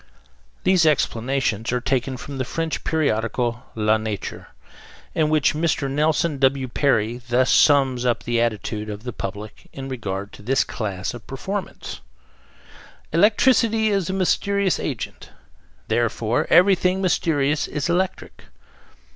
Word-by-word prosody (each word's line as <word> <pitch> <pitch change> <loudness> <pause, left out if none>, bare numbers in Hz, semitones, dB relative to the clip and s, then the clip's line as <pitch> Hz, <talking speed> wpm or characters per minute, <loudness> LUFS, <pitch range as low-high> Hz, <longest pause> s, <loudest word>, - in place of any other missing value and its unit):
These 185 -2 +4
explanations 120 -5 0
are 125 - +1
taken 130 +1 -1
from 140 +2 -7
the - - +1
French 165 +5 -3
periodical 120 -4 -1
La 110 0 +2
Nature, 110 -2 -5 0.7
in 155 -2 +1
which 155 -2 +3
Mr. 155 -2 0
Nelson 150 +1 +1
W. 135 -1 +2
Perry 120 -3 +1
thus 125 +1 +1
sums 135 -4 +4
up 120 -2 0
the 120 -1 0
attitude 110 -2 -2
of 105 +1 -7
the 125 -2 -5
public 105 +2 -7
in 135 0 -7
regard 100 -5 -5
to - - -12
this 135 +5 +2
class 100 -5 -4
of 120 -2 -11
performance: 190 +9 -5 1.1
"Electricity 220 +4 +3
is 195 -3 0
a - - -1
mysterious 195 +1 +1
agent; 130 -10 -5 0.6
therefore 120 +4 0
everything 180 +1 +4
mysterious 155 -5 +1
is 150 0 -3
electric." 180 +2 -2
135 Hz, 130 wpm, -22 LUFS, 115-165 Hz, 1.1 s, These